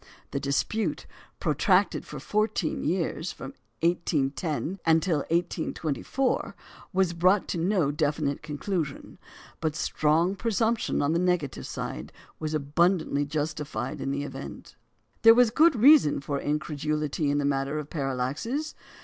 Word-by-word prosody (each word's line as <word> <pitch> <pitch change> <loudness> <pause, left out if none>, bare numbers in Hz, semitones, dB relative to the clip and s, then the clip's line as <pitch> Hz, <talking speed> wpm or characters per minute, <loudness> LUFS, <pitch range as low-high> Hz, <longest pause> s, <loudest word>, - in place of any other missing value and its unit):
The 140 - -1
dispute, 140 +11 -1 0.3
protracted - - +2
for - - -7
fourteen 210 -6 -1
years, 170 +1 -1
from - - -9 0.3
1810 165 +1 0
until 165 +1 +3
1824, 165 - -1 0.4
was 185 -3 +1
brought 185 +4 +3
to 170 - -2
no 175 -4 +2
definite 150 -1 -1
conclusion; 155 0 -4 0.4
but 155 -2 -1
the - - -7
strong 160 +6 +1
presumption 225 -3 0
on 145 +3 +1
the 170 - +2
negative 180 -6 -1
side - - -5 0.3
was 155 0 -2
abundantly 155 0 +1
justified 150 -5 -3
in - - -2
the 140 +1 -2
event. 145 - -8 0.5
There 225 0 +8
was 245 -2 +5
good 315 +4 +5
reason 250 - +6
for 140 0 -3
incredulity 150 0 -1
in 145 - +1
the 145 - 0
matter 140 +1 0
of 150 -1 -6
parallaxes. 145 - -2
155 Hz, 130 wpm, -27 LUFS, 145-185 Hz, 0.5 s, There